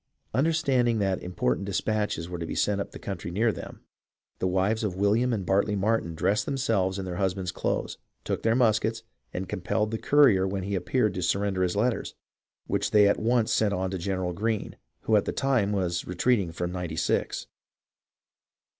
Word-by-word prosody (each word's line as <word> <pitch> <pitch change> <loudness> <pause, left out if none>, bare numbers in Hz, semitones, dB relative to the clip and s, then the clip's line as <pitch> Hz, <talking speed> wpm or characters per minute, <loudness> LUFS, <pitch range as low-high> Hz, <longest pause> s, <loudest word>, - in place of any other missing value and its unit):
Understand 140 -4 +2
ing 115 - +1
that 95 -3 0
important 90 -1 -1
despatches 105 -3 -1
were 90 -1 -6
to 85 - -3
be - - -4
sent 100 -1 +1
up - - -5
the - - -10
country 95 -4 -5
near 110 +6 +2
them, - - -9 0.6
the 95 - 0
wives 95 +5 +1
of 100 -4 -1
William 105 +6 +2
and 105 -5 -2
Bartly 100 +2 +2
Martin 100 -4 0
dressed 100 +6 +1
themselves 110 -9 0
in 95 - -4
their 90 -1 -4
husbands' 95 -1 -1
clothes, - - -2 0.2
took - - -2
their 115 0 +2
muskets, 115 -2 +2 0.3
and 95 +1 -4
compelled 105 +5 -1
the 110 - -2
courier 130 -11 +5
when 95 0 -3
he 100 +2 -3
appeared 105 +2 +1
to 90 - -3
surrender 95 +2 0
his 90 0 +1
letters, 115 +3 0 0.5
which - - -1
they 105 -1 +6
at 100 - +2
once 115 0 +2
sent 105 -2 +2
on 95 0 -2
to 95 - -3
General 95 0 -2
Greene, 110 +3 -2 0.3
who 110 - +2
at 105 - +3
the - - -1
time 130 -7 +1
was 90 -4 -1
retreating 95 0 +1
from 85 +1 -3
Ninety 90 -3 -4
Six. 80 - -1
100 Hz, 190 wpm, -27 LUFS, 90-110 Hz, 0.6 s, they